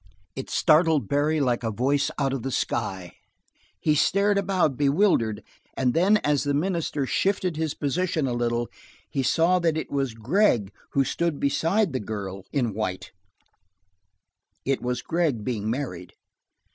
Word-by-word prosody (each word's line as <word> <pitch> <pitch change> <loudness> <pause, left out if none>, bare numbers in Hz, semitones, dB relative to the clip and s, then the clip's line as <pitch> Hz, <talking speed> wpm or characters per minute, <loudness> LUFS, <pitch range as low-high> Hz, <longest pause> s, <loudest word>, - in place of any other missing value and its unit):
It 135 - -6
startled 155 - +3
Barry 150 +4 +1
like 125 -4 +1
a 115 - -1
voice 140 +6 +1
out 135 -2 0
of 135 - -3
the 135 - -3
sky; 95 -8 -3 0.6
he 155 - +2
stared 200 +7 +3
about, 185 -8 +1
bewildered, 140 - +2 0.3
and 125 -2 +1
then 190 +6 +4
as 145 -2 +2
the 145 -1 0
minister 160 -3 -1
shifted 185 +3 0
his 160 -1 -2
position 155 +1 -1
a 125 - -1
little 120 0 -1 0.4
he 135 - 0
saw 165 +7 +3
that 165 -2 +1
it 160 - -4
was 135 -5 -1
Gregg 120 - +2 0.2
who 140 - +3
stood 170 +3 -1
there - - -10
beside 165 +6 +1
the 130 - -1
girl 100 -2 -6
in 120 -6 0
white, 95 -3 -4 1.5
it 135 0 0
was 125 0 -2
Gregg 160 -10 0
being 110 -3 -2
married. 110 -9 -4
140 Hz, 155 wpm, -25 LUFS, 120-160 Hz, 1.5 s, then